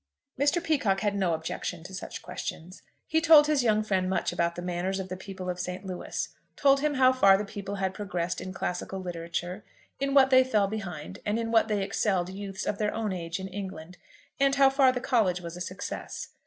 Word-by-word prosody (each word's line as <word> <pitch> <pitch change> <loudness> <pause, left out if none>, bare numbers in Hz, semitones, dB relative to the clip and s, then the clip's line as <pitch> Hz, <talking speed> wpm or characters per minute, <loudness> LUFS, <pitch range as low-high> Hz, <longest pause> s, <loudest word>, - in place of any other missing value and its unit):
Mr. 290 +5 +3
Peacocke 225 - +1
had 205 -2 0
no 185 -4 +1
objection 160 +1 -5
to 190 - -10
such 190 - -7
questions. 180 +4 -6 0.2
He 320 +1 +1
told 315 -2 +8
his 300 -2 +2
young 215 -2 +3
friend 190 -3 0
much 190 - 0
about 170 0 0
the 175 - -6
manners 180 +2 -2
of 190 0 -5
the 185 - -3
people 190 0 -8
of 180 0 -3
St. 180 +2 -4
Louis, 185 -2 -4 0.3
told 275 -1 +4
him 295 0 0
how 260 -1 +5
far 195 -7 +6
the 210 - -3
people 200 0 -6
had 190 -1 -1
progressed 180 -4 -3
in 185 - -6
classical 190 0 -3
literature, 175 +2 -4 0.4
in 275 0 0
what 265 -1 +6
they 260 0 +7
fell 215 -6 +2
behind, 185 -8 -6
and 210 +1 0
in 225 0 -2
what 225 -1 +4
they 210 -3 0
excelled 190 -3 0
youths 195 0 -6
of 200 - -2
their 210 -1 0
own 220 -3 -1
age 170 0 -4
in 190 - -5
England, 185 -3 -7 0.4
and 275 0 +3
how 275 -1 +6
far 270 -1 +5
the 250 -1 -3
college 220 -9 +2
was 170 -1 -7
a 180 - -8
success. 185 +1 -5
195 Hz, 215 wpm, -28 LUFS, 180-230 Hz, 0.4 s, told